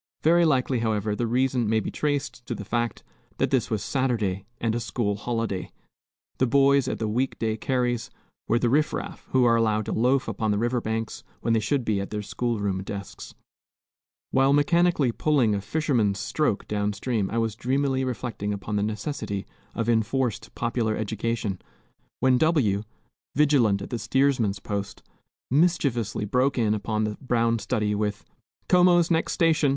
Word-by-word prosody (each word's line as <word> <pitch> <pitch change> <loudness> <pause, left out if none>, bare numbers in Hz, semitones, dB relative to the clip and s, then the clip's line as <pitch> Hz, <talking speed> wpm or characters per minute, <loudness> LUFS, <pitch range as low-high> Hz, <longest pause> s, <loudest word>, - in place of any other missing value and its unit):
Very 170 +2 +5
likely, 130 -4 +2
however, 110 -2 0
the 120 +2 -1
reason 125 -1 +1
may 110 0 +3
be - - -4
traced 145 -4 -2
to 120 - -2
the 105 - -7
fact 120 +1 -2 0.3
that - - 0
this - - +1
was 110 -3 -1
Saturday, 110 -8 -1
and 115 -1 0
a 120 - -1
school 115 -3 -1
holiday. 115 -3 -3 0.7
The 130 - +3
boys 140 +1 +4
at - - -2
the 110 - -2
week 125 +5 -1
day 110 -1 -1
carries 120 0 -1 0.4
were 115 - +3
the 120 - +1
riff 150 +5 +2
raff, - - -6
who 130 -1 +3
are 115 -1 +5
allowed 110 -2 +1
to - - -4
loaf 125 +4 +2
upon 110 - -2
the 105 - +1
river 120 +2 0
banks 110 0 -3 0.2
when 115 - +1
they 115 - +3
should 120 +4 0
be 105 -3 +1
at 100 - -5
their 105 -1 -4
school 115 +4 -2
room 100 -2 -1
desks. 100 0 -8 1.0
While 135 +1 +4
mechanically 155 -2 +3
pulling 130 -4 +2
a 100 - -1
"fisherman's 120 -8 0
stroke" 130 -2 -1
down 105 0 -1
stream 105 -2 -1
I 115 - -3
was 115 -2 0
dreamily 130 +2 0
reflecting 120 -5 -3
upon 105 +1 -3
the - - +1
necessity 105 -1 -3 0.3
of 115 -1 -1
enforced 120 +2 0
popular 115 -2 0
education, 110 -2 -2 0.6
when 130 -1 +4
W, 135 -12 +2 0.5
vigilant 130 -9 +3
at - - -9
the 120 - -2
steersman's 130 -8 +1
post, 100 0 -5 0.5
mischievously 135 - +1
broke 130 +5 +1
in 110 -3 +2
upon 110 0 -1
the 105 -1 -3
brown 115 -3 +1
study 105 0 -1
with, 105 -1 -2 0.4
"Como's 175 -1 +5
next 165 0 +1
station! 160 -3 +3
115 Hz, 170 wpm, -25 LUFS, 105-135 Hz, 1.0 s, Very